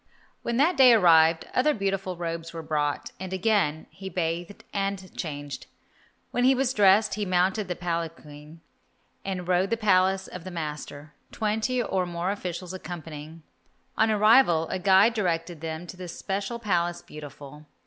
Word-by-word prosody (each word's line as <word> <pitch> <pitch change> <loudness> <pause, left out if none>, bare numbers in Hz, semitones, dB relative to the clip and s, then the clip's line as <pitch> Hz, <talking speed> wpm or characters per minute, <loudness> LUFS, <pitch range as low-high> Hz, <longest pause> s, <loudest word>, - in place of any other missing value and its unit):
When 235 - -2
that 325 +7 +3
day 255 -3 +8
arrived 165 -5 +5
other 295 +4 +2
beautiful 195 -3 -2
robes 165 -1 -5
were 165 -1 -6
brought, 150 -2 -2
and 190 0 -6
again 190 -5 +1
he 190 0 -8
bathed 175 +2 -3
and 195 -2 -3
changed. 145 -3 -6 0.6
When 245 - 0
he 265 +1 +5
was 260 0 0
dressed, 205 0 +4
he 210 - -2
mounted 190 +2 +1
the 180 - -3
palanquin 165 -3 -6 0.6
and 185 -2 -4
rode 185 +1 +2
to 230 - +1
the - - -13
Palace 190 -2 +2
of 180 - -9
the 185 - -7
master, 150 -3 -6 0.2
twenty 220 +4 -1
or 185 -4 -1
more 175 +2 -2
officials 180 -2 -5
accompanying. 160 -3 -8 0.5
On 220 - +3
arrival, 215 -6 +5
a 185 - -2
guide 195 +4 +5
directed 170 -6 -2
them 160 +1 -5
to 175 - -9
the 180 -1 -7
special 195 +5 -4
Palace 175 -5 -1
Beautiful. 150 0 -11
180 Hz, 160 wpm, -26 LUFS, 165-205 Hz, 0.6 s, day